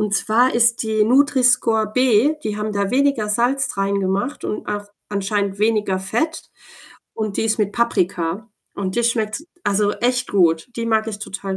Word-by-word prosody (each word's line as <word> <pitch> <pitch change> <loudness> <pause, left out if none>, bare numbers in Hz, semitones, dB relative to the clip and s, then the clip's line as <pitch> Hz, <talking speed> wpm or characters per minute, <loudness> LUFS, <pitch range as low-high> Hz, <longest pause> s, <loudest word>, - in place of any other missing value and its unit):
Und 210 -1 -1
zwar 230 +6 +2
ist 235 0 +3
die 220 -1 +1
Nutri-Score-B, 250 -1 +3
die 210 -1 -3
haben 210 0 -3
da 200 -1 -1
weniger 260 -4 +1
Salz 250 +5 +1
reingemacht 200 +6 -2
und - - -4
auch 205 0 -4 0.2
anscheinend 200 -1 -2
weniger 210 -3 +1
Fett, 240 - -3 0.6
und 215 -2 -3
die - - +2
ist 225 0 0
mit 205 -1 0
Paprika, 195 -3 -1 0.2
und 190 -1 -3
die 240 - +2
schmeckt, 230 +4 -1 0.2
also, 205 +1 +1
echt 250 +1 -1
gut. 165 -3 +2
Die 230 - -3
mag 220 -1 +1
ich 210 -2 -5
total 195 -2 -5
215 Hz, 160 wpm, -20 LUFS, 200-235 Hz, 0.6 s, ist